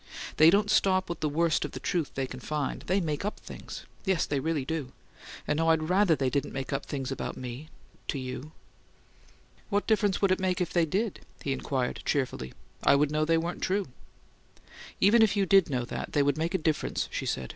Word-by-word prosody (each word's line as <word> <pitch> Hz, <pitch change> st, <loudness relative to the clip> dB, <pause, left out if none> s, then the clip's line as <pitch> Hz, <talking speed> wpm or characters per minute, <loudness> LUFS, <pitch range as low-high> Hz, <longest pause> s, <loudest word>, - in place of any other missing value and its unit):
They 155 Hz, +1 st, +8 dB
don't 205 Hz, +3 st, +3 dB
stop 190 Hz, -4 st, +3 dB
with 170 Hz, -, -4 dB
the 155 Hz, -, 0 dB
worst 165 Hz, +2 st, +2 dB
of -, -, -5 dB
the -, -, -5 dB
truth 170 Hz, -5 st, -2 dB
they 135 Hz, -, 0 dB
can 130 Hz, 0 st, -8 dB
find: 150 Hz, +1 st, -3 dB
they 190 Hz, +2 st, +2 dB
make 155 Hz, -3 st, -2 dB
UP 210 Hz, -, -3 dB
things -, -, -9 dB, 0.2 s
yes, 190 Hz, -5 st, +1 dB
they 145 Hz, -, -1 dB
really 155 Hz, -2 st, -1 dB
do! 150 Hz, -4 st, -3 dB, 0.5 s
And, 150 Hz, -, +1 dB
oh, 165 Hz, -, +2 dB
I'd 160 Hz, 0 st, +2 dB
RATHER 185 Hz, -3 st, +4 dB
they 130 Hz, -2 st, 0 dB
didn't 140 Hz, +2 st, -1 dB
make 135 Hz, +1 st, -4 dB
up 135 Hz, -, -3 dB
things 135 Hz, -2 st, -3 dB
about 135 Hz, -, -4 dB
me 130 Hz, +5 st, -7 dB, 0.4 s
to -, -, -1 dB
you!" 130 Hz, +3 st, -6 dB, 1.2 s
"What 205 Hz, -1 st, +1 dB
difference 210 Hz, -3 st, +2 dB
would 195 Hz, -2 st, +3 dB
it 185 Hz, -, +2 dB
make 185 Hz, -1 st, 0 dB
if 180 Hz, -2 st, -2 dB
they 170 Hz, -2 st, +3 dB
did?" 200 Hz, +6 st, -1 dB, 0.2 s
he 140 Hz, -, 0 dB
inquired, 130 Hz, -1 st, -2 dB
cheerfully. 130 Hz, -, -1 dB, 0.3 s
"I'd 145 Hz, +1 st, +4 dB
know 155 Hz, 0 st, +1 dB
they 165 Hz, +1 st, +3 dB
weren't 170 Hz, +2 st, -3 dB
true." 195 Hz, -4 st, 0 dB, 1.1 s
"Even 220 Hz, +4 st, +6 dB
if 210 Hz, -2 st, +4 dB
you 200 Hz, -, +3 dB
did 195 Hz, -3 st, +5 dB
know 125 Hz, -3 st, -1 dB
that, -, -, -5 dB
they'd 145 Hz, -2 st, +3 dB
make 165 Hz, +3 st, -1 dB
a -, -, +4 dB
difference," 155 Hz, -3 st, -1 dB
she -, -, -3 dB
said. 65 Hz, -1 st, -2 dB
155 Hz, 210 wpm, -29 LUFS, 140-185 Hz, 1.2 s, They